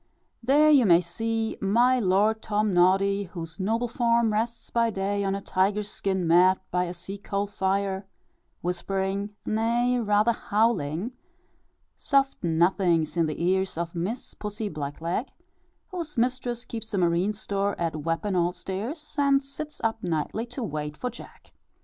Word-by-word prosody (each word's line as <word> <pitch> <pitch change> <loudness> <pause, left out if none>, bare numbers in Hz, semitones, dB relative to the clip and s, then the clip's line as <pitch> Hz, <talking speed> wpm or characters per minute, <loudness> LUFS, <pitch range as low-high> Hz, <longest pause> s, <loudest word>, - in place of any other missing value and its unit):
There 290 +5 +5
you 265 -7 +6
may 170 -2 +7
see 225 +6 -2
my 240 +6 +4
Lord 210 +2 +2
Tom 210 -1 0
noddy, 195 +3 +3
whose 170 -1 -8
noble 225 +5 0
form 235 -1 +2
rests 230 +2 -2
by 230 -1 +2
day 200 0 -1
on 195 0 0
a 200 - -4
tiger 195 +3 +1
skin 195 -3 -2
mat 180 +3 +5
by 180 0 +1
a 175 - -5
sea 195 +3 -7
coal 200 0 -2
fire, 195 -1 -1 0.5
whispering, 195 +3 -2
nay, 235 +3 +1
rather 210 0 +3
howling, 210 - 0 0.8
soft 275 -4 +1
nothings 170 -1 +2
in 165 -2 +2
the 155 +2 -3
ears 190 -1 +1
of 170 0 -3
Miss 185 +8 -4
Pussy 210 0 -4
Black 145 -2 -5
leg, 175 +10 -1 0.6
whose 340 -7 -6
mistress 245 0 -1
keeps 225 -2 -5
a - - 0
marine 175 +3 +2
store, 200 -1 -2
at 165 -2 -1
Wapping 165 +6 -1
Old 175 0 +1
stairs, 245 - -5
and 280 -1 +4
sits 300 +2 -8
up 225 0 0
nightly 175 +7 -2
to 250 +1 -5
"wait 150 -5 -4
for 250 - -3
Jack." 240 - -13
200 Hz, 155 wpm, -26 LUFS, 180-230 Hz, 0.8 s, may